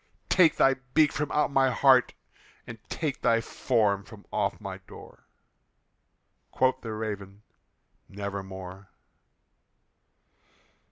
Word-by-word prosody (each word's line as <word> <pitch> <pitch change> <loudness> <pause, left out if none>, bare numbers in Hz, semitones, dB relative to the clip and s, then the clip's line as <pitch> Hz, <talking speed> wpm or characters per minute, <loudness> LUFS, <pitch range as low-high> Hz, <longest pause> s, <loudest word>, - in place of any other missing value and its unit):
Take 170 -5 +5
thy 135 0 +3 0.2
beak 155 -2 +5
from 150 0 -3
out 150 -1 +1
my 135 -1 +3
heart, 130 0 +4 0.5
and 115 -1 -9
take 150 -5 -3
thy 115 0 +3
form 105 -4 0
from 105 -1 -14
off 105 +1 -1
my 95 -2 -7
door!" 95 - -15 1.2
Quoth 130 0 +1
the 110 -2 -5
Raven, 105 -2 -6 0.7
"Nevermore." 95 -1 -7
110 Hz, 105 wpm, -27 LUFS, 100-135 Hz, 1.2 s, Take